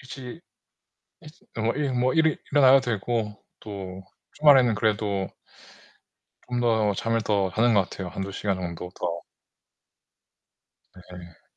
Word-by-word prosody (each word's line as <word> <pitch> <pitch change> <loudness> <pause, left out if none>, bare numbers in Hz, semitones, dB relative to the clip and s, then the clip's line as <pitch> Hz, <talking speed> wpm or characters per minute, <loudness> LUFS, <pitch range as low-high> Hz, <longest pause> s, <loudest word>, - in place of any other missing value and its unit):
일찍 130 +2 -9 0.8
일찍 155 0 -16
어 - - -1
일 145 -3 -1
뭐 125 +1 +1
일어나야 145 -4 +4
되고 115 -3 -2 0.2
또 95 -3 -8 0.3
주말에는 135 -6 +5
그래도 105 -3 0 1.2
좀 125 -1 -1
더 110 -3 +2
잠을 115 +2 0
더 100 -3 0
자는 115 +4 +2
것 95 -3 +2
같아요. 95 -2 -6
1-2 95 +2 -5
시간 100 -1 -2
정도 90 0 -6
더. 85 -1 -4 1.9
네. 85 -2 -12
110 Hz, 195 characters per minute, -25 LUFS, 95-125 Hz, 1.9 s, 주말에는